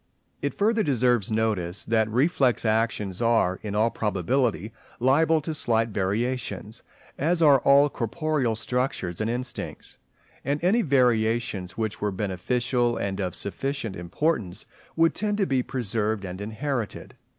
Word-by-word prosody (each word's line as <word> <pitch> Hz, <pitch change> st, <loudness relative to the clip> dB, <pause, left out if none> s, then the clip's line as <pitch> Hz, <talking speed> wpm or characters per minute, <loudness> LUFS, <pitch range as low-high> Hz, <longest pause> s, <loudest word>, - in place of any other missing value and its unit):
It 140 Hz, -, -2 dB
further 220 Hz, +2 st, +2 dB
deserves 125 Hz, -, +2 dB
notice 105 Hz, -5 st, 0 dB
that 110 Hz, -1 st, +1 dB
reflex 130 Hz, -, +2 dB
actions 110 Hz, -3 st, 0 dB
are 115 Hz, -6 st, +2 dB
in 105 Hz, -1 st, -5 dB
all 110 Hz, +2 st, +2 dB
probability 110 Hz, -, -1 dB, 0.3 s
liable 155 Hz, +5 st, +3 dB
to 160 Hz, +2 st, -4 dB
slight 115 Hz, -6 st, +1 dB
variations, 110 Hz, +3 st, -2 dB, 0.4 s
as 165 Hz, +5 st, +1 dB
are 140 Hz, -3 st, +7 dB
all 140 Hz, +2 st, +5 dB
corporeal 135 Hz, 0 st, -1 dB
structures 115 Hz, -7 st, -2 dB
and 110 Hz, -, 0 dB
instincts; 120 Hz, 0 st, -4 dB, 0.4 s
and 140 Hz, +2 st, -1 dB
any 205 Hz, +7 st, +3 dB
variations 115 Hz, -, +1 dB
which 110 Hz, -2 st, -3 dB
were 105 Hz, -, +1 dB
beneficial 120 Hz, +6 st, -1 dB
and 100 Hz, -1 st, -3 dB
of 90 Hz, -3 st, -2 dB
sufficient 125 Hz, 0 st, -3 dB
importance, 100 Hz, -, -2 dB, 0.3 s
would 165 Hz, 0 st, +3 dB
tend 210 Hz, -1 st, -1 dB
to 200 Hz, -, +2 dB
be 135 Hz, -6 st, +1 dB
preserved 110 Hz, -5 st, -2 dB
and 90 Hz, +1 st, -6 dB
inherited. 115 Hz, +2 st, -4 dB
115 Hz, 135 wpm, -25 LUFS, 105-140 Hz, 0.4 s, are